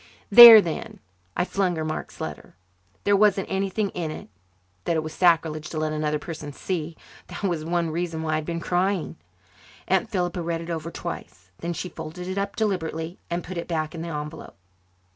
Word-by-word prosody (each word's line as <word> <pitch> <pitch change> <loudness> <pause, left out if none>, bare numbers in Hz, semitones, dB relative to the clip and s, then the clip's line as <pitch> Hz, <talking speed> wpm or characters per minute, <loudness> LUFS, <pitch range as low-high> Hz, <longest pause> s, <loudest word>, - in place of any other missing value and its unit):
"There, 230 0 +12
then!" 165 -5 -5 0.4
I - - +2
flung 190 -2 0
her 160 -1 -3
Mark's 155 0 -5
letter. - - -7 0.5
There 205 - +3
wasn't 205 -1 +2
anything 195 +1 -1
in 170 -3 -4
it 155 - -8 0.6
that 170 - +1
it 160 - 0
was 155 0 -6
sacrilege 160 -3 +2
to 160 - -6
let 155 0 -1
another 150 0 -1
person 150 -1 -7
see. 165 -1 -4 0.3
That - - -9
was 175 -5 -1
one 170 0 -1
reason 165 -1 -3
why 155 - -2
I - - +2
had 155 - -4
been 170 0 -3
crying. 180 +2 -1 0.7
Aunt - - +1
Philippa 180 -4 -2
read 165 0 -2
it 170 +1 -6
over 165 0 -4
twice. 95 - -8
Then 170 +1 -3
she 180 - -5
folded 165 +1 -8
it 185 +1 -2
up 200 0 -3
deliberately 170 -5 -2
and 170 0 -2
put 180 0 -5
it - - -6
back 155 -2 -2
in 165 - -6
the 170 - -5
envelope. 150 0 -7
170 Hz, 195 wpm, -24 LUFS, 155-185 Hz, 0.7 s, There